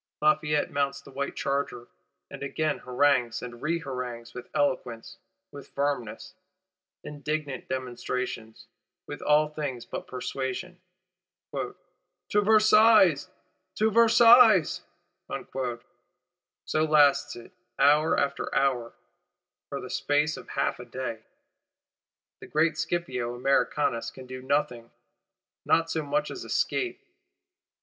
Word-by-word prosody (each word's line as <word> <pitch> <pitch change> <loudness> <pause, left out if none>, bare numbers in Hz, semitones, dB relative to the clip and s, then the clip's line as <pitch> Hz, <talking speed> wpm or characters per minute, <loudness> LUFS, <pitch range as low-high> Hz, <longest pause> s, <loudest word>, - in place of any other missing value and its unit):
Lafayette 150 -1 +2
mounts 140 0 -1
the 140 - -14
white 140 +1 -4
charger; 140 -3 -2 0.4
and - - -9
again 150 +2 -1
harangues 125 -2 +1
and 120 -1 -9
reharangues: 125 -7 -4
with 125 0 -9
eloquence, 125 -5 -2 0.3
with 140 -1 -11
firmness, 140 -6 -3 0.7
indignant 150 -2 -4
demonstration; 125 -3 -4 0.5
with - - -8
all 150 +1 +3
things 145 -6 -5
but - - -7
persuasion. 130 +7 -5 0.7
'To - - -4 0.7
Versailles! 215 -5 +5 0.5
To 220 +1 +2
Versailles!' 230 -3 +6 1.9
So 155 - +1
lasts 150 -2 +4
it, 120 +8 -12 0.3
hour 150 +3 +4
after 140 - -2
hour; 130 -4 0 0.7
for - - -4
the - - -8
space 150 +2 +1
of - - -11
half - - -1
a 125 - -8
day. 120 -2 -5 1.2
The - - -11
great 160 +1 +1
Scipio 155 -7 -2
Americanus 130 -1 0
can 130 - -12
do 130 0 -8
nothing; 125 -4 -1 0.7
not 165 0 +2
so 160 - -1
much 155 - -1
as - - -7
escape. 375 +1 -2
140 Hz, 110 wpm, -27 LUFS, 125-155 Hz, 1.9 s, Versailles